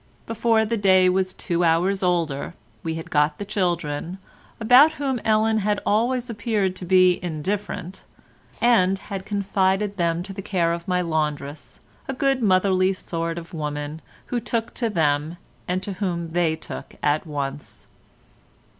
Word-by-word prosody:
Before 225 0 +2
the 230 +1 -1
day 185 -2 +5
was 185 0 +1
two 175 -1 -2
hours 175 +4 +2
older 170 -6 -1 0.3
we 160 0 -3
had 165 - -7
got 150 0 +2
the 205 - -5
children, 175 -4 -2 0.4
about 250 +8 +6
whom 275 -5 -2
Ellen 220 0 +3
had 210 0 0
always 240 +4 +1
appeared 210 -4 -1
to 180 - -6
be 185 0 +4
indifferent, 185 +2 -4 0.6
and 195 -6 +4
had 195 -1 -7
confided 200 0 0
them 170 -1 0
to 195 +1 -7
the 195 - -6
care 175 -4 0
of 170 0 -6
my 180 -1 +1
laundress, 150 -5 -3 0.3
a 270 - -2
good 270 0 +1
motherly 185 -2 +3
sort 165 -2 -4
of 170 0 -8
woman, 150 0 -4 0.2
who 245 - -2
took 230 0 -2
to 235 -2 -1
them 155 -3 0 0.3
and 185 +1 -1
to 200 - -3
whom 175 -4 -3
they 165 -2 +1
took - - -9
at 150 +3 +1
once. 145 -1 -5
185 Hz, 155 wpm, -23 LUFS, 165-210 Hz, 0.6 s, about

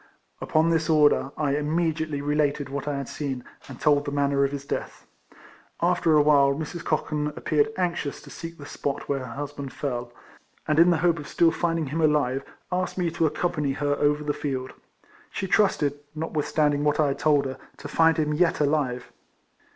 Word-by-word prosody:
Upon 160 +1 +2
this 160 -1 +1
order 150 -3 +4
I 145 -2 +1
immediately 155 -1 -1
related 145 -1 0
what 140 +1 -4
I 145 -1 -1
had 140 - -4
seen, 135 -4 -4 0.2
and 130 -3 -10
told 145 -2 +3
the 145 - -4
manner 140 -1 +1
of 140 - +1
his 140 -1 -5
death. - - -5 0.7
After 175 -2 +2
awhile 145 -2 +5
Mrs. 160 +3 -5
Cochan 150 -1 -1
appeared 150 +3 +1
anxious 175 -5 -2
to - - -12
seek 165 0 -8
the 145 - -10
spot 140 -1 -4
where 140 -1 0
her 125 -3 -7
husband 145 -1 -6
fell, 120 -4 -4 0.6
and 155 0 +2
in 170 +1 +7
the 170 - +3
hope 170 -2 +3
of 150 - -8
still 165 +1 +3
finding 165 -2 -1
him 150 +4 -2
alive, 145 -4 +2 0.3
asked 180 +1 -1
me 175 -3 0
to 165 0 +1
accompany 150 -3 -1
her 145 +1 0
over 150 0 +1
the 145 0 -1
field. 130 -3 -4 0.6
She - - -4
trusted, 160 -8 +2 0.2
notwithstanding 150 -2 0
what 150 0 +1
I 150 -2 +4
had 135 - -3
told 145 -2 +3
her, 130 0 -5 0.2
to - - -8
find 160 +2 +3
him 150 -1 +1
yet 170 +2 +2
alive. 140 -4 0
150 Hz, 185 wpm, -25 LUFS, 140-160 Hz, 0.7 s, in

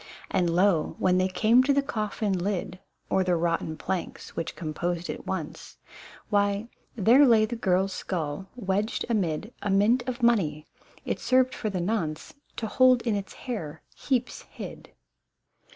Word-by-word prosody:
And 175 -2 +2
lo, 175 -1 +2
when 185 0 +2
they 185 - +2
came 220 +6 +4
to 280 +2 +2
the 280 0 +2
coffin 215 -4 -2
lid, 185 0 -2 0.3
Or 190 - +3
rotten 170 -3 0
planks 185 +2 -5
which 165 - -4
composed 170 +1 -3
it - - -9
once, 175 -6 -5 0.5
Why. 205 +2 +1 0.3
there 235 +6 +6
lay 220 -3 +5
the 235 +2 -4
girl's 190 -3 +1
skull 170 +1 -4
wedged 205 -1 -1
amid 205 0 -1
A 205 - -2
mint 205 +6 +4
of 240 -1 -5
money, 165 -11 +2 0.4
it - - -2
served 255 0 +3
for 215 - -3
the 185 -3 -2
nonce 170 -6 -2 0.2
To 225 - -3
hold 255 +2 +4
in 230 - 0
its 200 -1 -5
hair 165 - -5
heaps 250 -3 -1
hid - - -9
195 Hz, 150 wpm, -27 LUFS, 175-230 Hz, 0.5 s, there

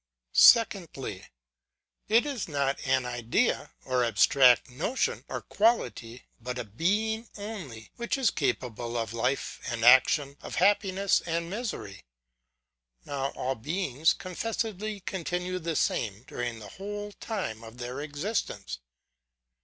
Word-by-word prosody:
Secondly. 170 - +4 0.8
It 230 +5 +4
is 275 -7 -3
not 140 -3 0
an 130 -1 +2
idea, 120 -1 0
or 125 -1 +1
abstract 120 +3 +5
notion, 155 - -1
or - - -4
quality, 200 - 0 0.2
but 125 +2 -4
a 125 - -2
being 210 - -1
only, 175 - -7
which 235 +4 -1
is 260 -6 +3
capable 120 -3 -2
of 115 -1 -3
life 125 +4 -1
and 115 -2 -1
action, 135 +3 +6
of - - -7
happiness 195 +1 +3
and 170 +1 -2
misery. 205 - -5 1.0
Now 135 -1 -2
all 130 +1 -1
beings 150 - 0
con 185 -1 -8
fessedly 215 -1 -3
continue 180 0 -2
the 165 -1 -3
same, 110 -5 0
during 120 -2 -4
the 105 -2 -10
whole 205 +1 -5
time 185 - -5
of 115 +1 -11
their 125 +3 -5
existence. 150 - -3
145 Hz, 125 wpm, -28 LUFS, 120-200 Hz, 1.0 s, action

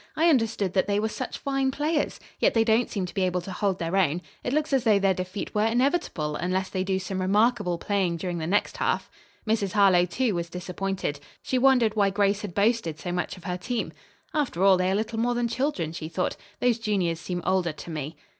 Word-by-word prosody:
"I 330 +2 +4
understood 225 - +1
that 190 - +2
they 205 0 +1
were 220 +1 0
such 255 +3 -5
fine 270 -1 0
players. 295 +3 -1 0.2
Yet - - +3
they 225 - +5
don't 225 +2 +2
seem 195 -3 -2
to 180 - -8
be 195 - -1
able 180 -1 +1
to 190 - -7
hold 195 -1 0
their 165 +1 -2
own. 175 -2 +2 0.2
It 245 - -2
looks 300 +1 0
as 265 -3 +3
though 215 -4 +5
their 195 -1 +3
defeat 185 +2 -5
were 210 +1 +2
inevitable, 240 - 0
unless 185 +3 -1
they 185 -1 -1
do 190 0 0
some 190 0 -3
remarkable 205 -1 +2
playing 185 -2 0
during 175 0 -3
the 160 - -3
next 205 +4 +1
half." - - -1 0.4
Mrs. 210 -3 0
Harlowe, 195 -4 +5
too, 225 +6 0
was 170 -1 -3
disappointed. 180 -3 -3 0.2
She 255 - 0
wondered 250 -4 +4
why 200 -2 +3
Grace 200 +1 +1
had 200 -5 -6
boasted 205 -6 +1
so 175 +2 -5
much 180 +1 -2
of 180 - -14
her 180 -2 -3
team. 240 +5 -3 0.4
"After 265 - 0
all, 195 -1 +7
they 185 0 +1
are 190 - +1
little 225 +2 -2
more 240 +1 +1
than 240 0 +1
children," 235 - -1
she 160 -1 -6
thought. 180 +2 -1 0.3
"Those 240 -2 +2
juniors 190 -7 0
seem 175 0 -4
older 185 -3 +1
to 155 - -10
me." 155 0 -5
195 Hz, 225 wpm, -26 LUFS, 180-230 Hz, 0.4 s, all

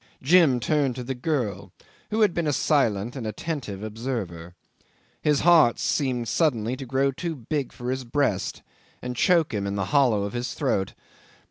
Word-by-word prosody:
Jim 150 -4 +5
turned 140 0 +1
to 125 - -5
the 135 +2 -3
girl, 120 - -2 0.4
who 220 +1 0
had 205 -5 +4
been 170 -2 -1
a - - +2
silent 120 -7 +1
and 120 -5 -4
attentive 110 -4 -5
observer. 105 -7 -5 0.7
His 150 -2 +2
heart 165 -8 +5
seemed 125 -5 -1
suddenly 120 -3 +1
to 135 -1 -7
grow 135 +2 +1
too 165 +4 -4
big 140 +2 -3
for 125 +1 -5
his 130 0 -3
breast 120 -5 -1 0.4
and 125 0 -4
choke 165 0 +3
him 100 -1 -2
in 100 - -3
the 100 -2 -1
hollow 125 -8 +4
of 100 - -4
his 120 +1 -3
throat. 115 - -1
125 Hz, 170 wpm, -25 LUFS, 110-150 Hz, 0.7 s, Jim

